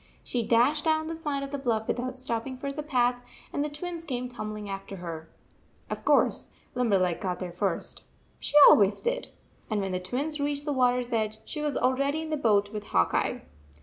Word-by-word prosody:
She 245 - -1
dashed 245 +7 +3
down 315 0 +2
the 330 +1 -4
side 295 -4 -2
of 275 - -6
the 285 - -3
bluff 225 -4 0
without 255 +1 -2
stopping 255 0 -3
for 275 +2 -4
the 295 +2 -4
path, 245 -4 +1 0.3
and 285 - 0
the 300 - -2
Twins 335 +3 -6
came 250 -5 -3
tumbling 215 -4 -6
after 195 0 -6
her. 165 -3 -7 0.6
Of - - -4
course, - - +3 0.2
Limberleg 195 -8 +1
got 180 -2 -1
there 180 -2 -5
first. 180 0 -2 0.4
She - - -3
always 200 -1 +5
did. - - -1 0.4
And 215 -2 0
when 195 -1 -2
the 185 - -1
Twins 280 +11 -3
reached 285 0 -1
the 295 - 0
water 250 -2 +3
s 245 0 -6
edge, 215 -1 0
she 300 - -4
was 295 -3 0
already 275 +4 +1
in 315 - -6
the - - +2
boat 210 -6 +2
with 210 -1 -5
Hawk 85 - +2
Eye. - - 0
250 Hz, 205 wpm, -28 LUFS, 210-290 Hz, 0.6 s, always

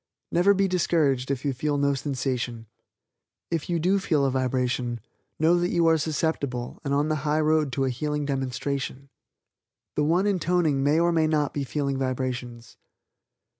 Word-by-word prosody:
Never 190 +4 +4
be 195 0 +2
discouraged 155 -8 +1
if 140 0 -2
you 140 - +1
feel 145 +3 -1
no 140 0 +2
sensation. 125 -4 -3 0.9
If 165 -1 -2
you 170 - +1
do 185 +5 +2
feel 155 -7 +1
a 135 - +1
vibration, 125 -2 -1 0.4
know 165 +3 +4
that 175 +1 0
you 170 -3 +2
are 165 0 +5
susceptible 145 -5 -2
and 140 - -3
on 145 +2 +2
the 155 - +1
high 150 +1 0
road 155 -2 +2
to 135 +2 0
a 130 - 0
healing 150 +3 -2
demonstration. 135 0 -3 0.9
The 150 - +1
one 170 +6 +2
intoning 175 -7 +1
may 145 +3 +3
or 170 +1 +3
may 160 -2 +2
not 150 -2 0
be 145 - -2
feeling 140 0 -2
vibrations. 125 -2 -4
145 Hz, 170 wpm, -26 LUFS, 130-160 Hz, 0.9 s, are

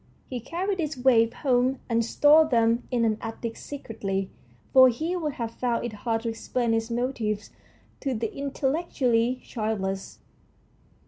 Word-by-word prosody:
He 250 - -2
carried 360 - -3
these 305 -3 -2
waifs 240 -2 +4
home 255 -1 +2
and 230 -1 +2
stored 300 +6 +5
them 230 0 +2
in 240 -2 +1
an 220 -1 +1
attic 225 0 -5
secretly, 195 -8 -4 0.4
for 260 -1 +9
he 320 +9 -2
would 310 -5 -2
have 230 -3 -4
found 240 -1 -1
it 235 - -4
hard 225 +1 -2
to 230 - -1
explain 230 +1 -1
his 225 +1 0
motives 230 -4 -2 0.5
to 270 -3 -2
the 225 0 -2
intel 275 -1 -2
lectually 255 -7 0
childless. 195 -4 -3
240 Hz, 150 wpm, -26 LUFS, 225-270 Hz, 0.5 s, for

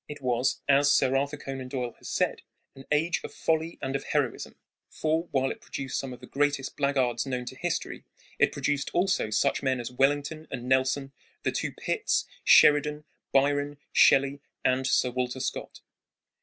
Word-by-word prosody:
It 150 - -8
was, 125 -1 0
as 140 +1 +5
Sir 135 -2 +3
Arthur 140 +2 0
Conan 135 -2 -6
Doyle 125 -2 -4
has - - -9
said, - - 0 0.3
"an 135 - -13
age 160 +4 +1
of - - -7
folly 160 +1 -1
and 135 +1 -2
of 140 - -2
heroism"; 145 -5 -2 0.3
for, 160 +2 -1
while 135 -1 +1
it - - -8
produced 135 -2 -4
some 135 - -5
of 125 0 -10
the - - -9
greatest 140 0 -1
black 140 0 0
guards 120 -1 +1
known 125 -2 -3
to 125 - -7
history, 165 +6 -3 0.4
it - - +4
produced 145 -1 -1
also 180 - +1
such 140 +6 +1
men 130 -2 0
as 120 0 -5
Wellington 145 +4 0
and 125 -2 -6
Nelson, 130 +1 +1 0.3
the - - +1
two - - -2
Pitts, - - -1 0.2
Sheridan, 150 0 +5 0.3
Byron, 145 +1 +2 0.2
Shelley, 140 +1 +4 0.2
and 130 +1 +2
Sir 125 - +2
Walter 125 +1 -2
Scott. 130 - -5
135 Hz, 175 wpm, -27 LUFS, 130-145 Hz, 0.4 s, as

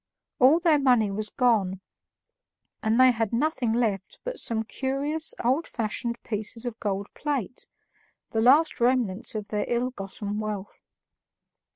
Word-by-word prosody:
All 270 +6 +6
their 330 -4 +4
money 245 -7 +3
was 210 +1 -3
gone, 210 -7 +1 1.0
and 220 +2 +1
they 255 0 +8
had 225 -3 -1
nothing 245 -1 0
left 220 -5 -1
but - - -3
some 225 -1 -1
curious 275 +6 -2
old 270 +7 +2
fashioned 235 +1 -3
pieces 220 +2 -4
of 235 -2 -5
gold 200 -1 -2
plate, 270 -6 -3 0.6
the 220 - 0
last 290 +7 +4
remnants 235 -3 +1
of 210 -1 -4
their 210 -1 -1
ill 245 +1 0
gotten 205 -1 -5
wealth. 210 -2 -5
235 Hz, 140 wpm, -26 LUFS, 210-260 Hz, 1.0 s, they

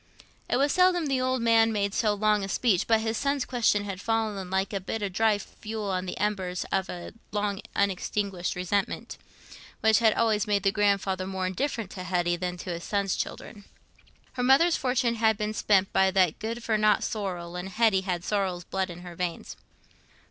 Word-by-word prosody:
It - - +2
was 280 +2 +2
seldom 365 -2 +3
the 270 -3 0
old 255 -1 0
man 225 -1 +4
made 200 -2 -1
so 215 -2 +1
long 210 0 +2
a 195 - -4
speech, 200 -4 +1
but 225 -1 +3
his 225 0 -1
son's 280 -1 0
question 225 -5 +1
had 195 -2 -6
fallen 215 -4 -1
like 190 +2 -1
a 195 - -1
bit 210 +3 -4
of 195 -2 -3
dry 220 +1 +3
fuel 210 0 -6
on 185 0 -2
the - - -5
embers 190 -3 -2
of 190 -1 0
a 175 -1 -7 0.2
long 205 -1 -1
unextinguished 195 -1 -1
resentment, 185 +2 -2 0.6
which 220 -1 +5
had 220 -2 +4
always 220 -1 +1
made 200 -2 +1
the 195 - +3
grandfather 200 -2 +1
more 190 -1 -3
indifferent 225 +1 -2
to 185 - -7
Hetty 175 -1 0
than 180 0 -4
to 180 - -6
his 170 0 -5
son's 200 -2 0
children. 205 -3 -6 0.7
Her 250 - -3
mother's 300 +7 +5
fortune 250 -2 0
had 220 -1 +3
been 210 +1 -2
spent 195 -3 +2
by 190 0 +4
that 185 -4 +2
good 230 +2 -4
for 220 -2 +1
nought 215 0 +3
Sorrel, 180 -5 -4
and 180 +2 -5
Hetty 215 -1 +3
had 180 -2 -3
Sorrel's 190 -4 -1
blood 190 +2 -2
in 175 0 -9
her 175 -1 -9
veins. 175 -1 -4
205 Hz, 195 wpm, -27 LUFS, 185-225 Hz, 0.7 s, which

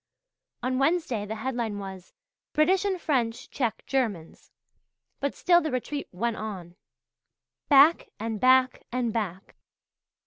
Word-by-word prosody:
On 255 +1 0
Wednesday 275 -8 0
the 220 - -4
headline 230 -2 -3
was 190 -2 -8 0.4
"British 365 +6 +3
and 380 -2 0
French 240 -8 -1
Check 240 -5 -2
Germans"; 220 -12 -2 0.7
but 280 0 -2
still 350 -1 +4
the 315 - -2
retreat 280 +2 -3
went 225 +5 -2
on. 185 -5 -7 0.9
Back 320 - +6
and 225 -1 -3
back 255 +2 +4
and 245 -3 -1
back! 195 -4 -4
245 Hz, 125 wpm, -27 LUFS, 215-285 Hz, 0.9 s, Back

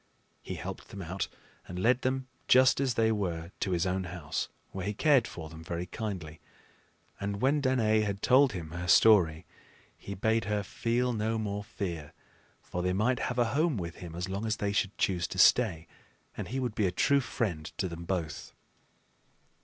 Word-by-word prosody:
He - - -6
helped - - -7
them 100 -1 -7
out 90 +2 -3 0.4
and 90 - -7
led 120 +7 +3
them 130 0 -1 0.2
just 130 0 +6
as 130 -4 +1
they 110 -1 +3
were 85 -5 -2
to 100 - -1
his 90 -1 +1
own 95 0 -1
house, 85 -4 -3 0.2
where 95 0 -4
he 105 - -2
cared 140 -3 +4
for 80 -2 -7
them 80 +1 -11
very 85 +2 -3
kindly. 90 -6 -5 0.8
And 100 0 -3
when 140 +5 +2
Danaë 110 -5 +3
had 100 -1 -3
told 130 -1 +5
him 80 -4 -6
her 85 +1 -5
story, 90 -3 +5 0.5
he 100 - -7
bade 110 +2 +1
her 105 -1 0
feel 120 +5 0
no 110 0 0
more 105 -2 -3
fear; 85 -8 -5 0.5
for 90 - -4
they 90 +1 0
might 115 +6 +1
have 125 - -4
a 120 -1 +2
home 155 -2 +2
with 85 -3 -5
him 85 -2 -8
as 90 +2 -3
long 100 +4 -3
as 110 - +1
they 100 -2 -1
should 100 -1 0
choose 90 -4 +1
to - - -7
stay, 95 -10 +5 0.5
and - - -5
he 130 - -3
would 125 -4 -2
be 105 -2 +1
a - - 0
true 140 +9 +3
friend 95 - -2
to 95 - 0
them 85 -1 -7
both. 85 -4 -3
100 Hz, 195 wpm, -30 LUFS, 90-115 Hz, 0.8 s, just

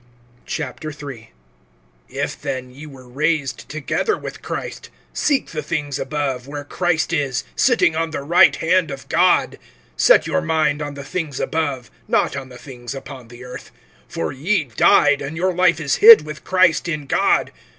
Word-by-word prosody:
III. 145 -6 -6 0.8
IF - - -4
then 130 -2 -4
ye 145 +4 -11
were 130 -3 -13
raised 145 -1 -2
together 155 - -1
with - - -8
Christ, - - -6 0.2
seek 285 -3 0
the 155 - -3
things 145 -2 -3
above, 135 -2 -3
where 145 0 -6
Christ 165 +2 -1
is, 140 -5 -1
sitting 245 -10 +3
on 165 0 -1
the 155 - -5
right 170 +5 +5
hand 175 0 +1
of 135 -2 -8
God. - - +2 0.4
(2)Set - - +5
your 80 - 0
mind 150 - 0
on 145 -1 -5
the 140 - -8
things 150 -2 -4
above, 145 -6 -2 0.2
not - - +1
on 130 - -6
the 125 - -12
things 125 0 -9
upon 135 -3 -10
the 120 +1 -13
earth. 125 0 -10 0.4
(3)For 85 +10 -3
ye 170 +7 0
died, 140 +3 +3
and 145 +3 -6
your 185 +1 0
life 175 -2 +3
is 140 -4 0
hid 220 -7 +9
with 150 0 -8
Christ 185 -3 +2
in 150 -3 -3
God. - - +1
145 Hz, 165 wpm, -20 LUFS, 135-160 Hz, 0.8 s, hid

